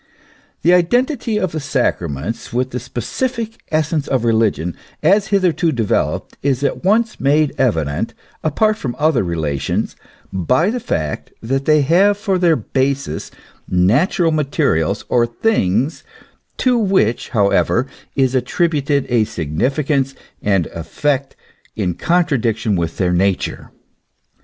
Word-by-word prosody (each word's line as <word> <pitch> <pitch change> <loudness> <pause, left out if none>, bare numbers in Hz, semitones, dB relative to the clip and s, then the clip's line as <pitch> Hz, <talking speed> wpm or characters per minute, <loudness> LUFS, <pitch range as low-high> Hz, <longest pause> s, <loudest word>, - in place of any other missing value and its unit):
The 175 - +5
identity 240 - +2
of 185 -5 -1
the 155 - -3
sacraments 115 - -2
with 125 +2 -1
the 125 - -3
specific 225 - -4
essence 155 -1 0
of 130 -3 0
religion 110 -7 +1 0.3
as 195 +5 +4
hitherto 180 -4 +2
developed 115 -7 -1
is 140 -1 0
at 140 - -1
once 220 +4 +2
made 145 +2 +2
evident, 80 - 0 0.3
apart 215 +8 +2
from 125 - -4
other 150 -4 +2
relations, 80 -6 -2 0.4
by 125 - +2
the 250 - -2
fact 75 - -3
that 135 +4 -1
they 155 -1 +4
have 190 +8 +4
for 200 -3 0
their 170 -3 +4
basis 135 - -2 0.4
natural 125 - +3
materials 135 - 0
or 120 -1 +2
things, 120 - 0 0.5
to 250 -2 +2
which, 190 - +1
however, 110 +3 +2 0.3
is 130 -2 +2
attributed 145 +1 +1
a 120 -3 +3
significance 135 - -1 0.3
and 95 -5 +2
effect 135 - -2 0.4
in 95 -5 -1
contradiction 120 - +1
with 85 -2 -2
their 90 -2 +1
nature. 95 +1 0
135 Hz, 125 wpm, -18 LUFS, 105-170 Hz, 0.5 s, The